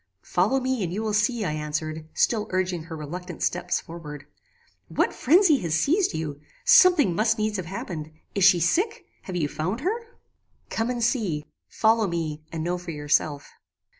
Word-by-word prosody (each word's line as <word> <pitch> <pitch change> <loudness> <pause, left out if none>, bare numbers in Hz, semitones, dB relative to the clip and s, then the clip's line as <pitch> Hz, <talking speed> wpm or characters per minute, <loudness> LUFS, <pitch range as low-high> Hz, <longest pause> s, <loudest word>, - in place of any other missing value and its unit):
"Follow 205 +10 +2
me, 260 -2 -1
and 170 - -2
you 210 +5 -3
will 215 -1 -1
see," 215 +1 +1
I 155 - -1
answered, 155 +1 -4
still 215 -2 +1
urging 185 -3 -1
her 165 -1 -7
reluctant 175 +3 -6
steps 175 0 0
forward. 150 -4 -9 0.6
"What - - 0
phrenzy 325 0 +4
has 165 -2 -1
seized 320 - +2
you? 150 -2 -4 0.2
Something 365 - +6
must 220 +5 +2
needs 215 -1 -1
have 185 -3 -5
happened. 165 -4 -6 0.2
Is 200 - 0
she 185 -1 +7
sick? 385 - 0 0.2
Have 185 - -5
you 160 -4 +1
found 185 - -3
her?" 370 +7 +1 0.8
"Come 225 +2 -1
and 240 -1 -2
see. 200 - 0 0.2
Follow 220 -1 +2
me, 160 -3 -3
and 160 -1 -4
know 175 +1 -1
for 180 -1 -9
yourself." 145 -1 0
180 Hz, 170 wpm, -25 LUFS, 160-225 Hz, 0.8 s, she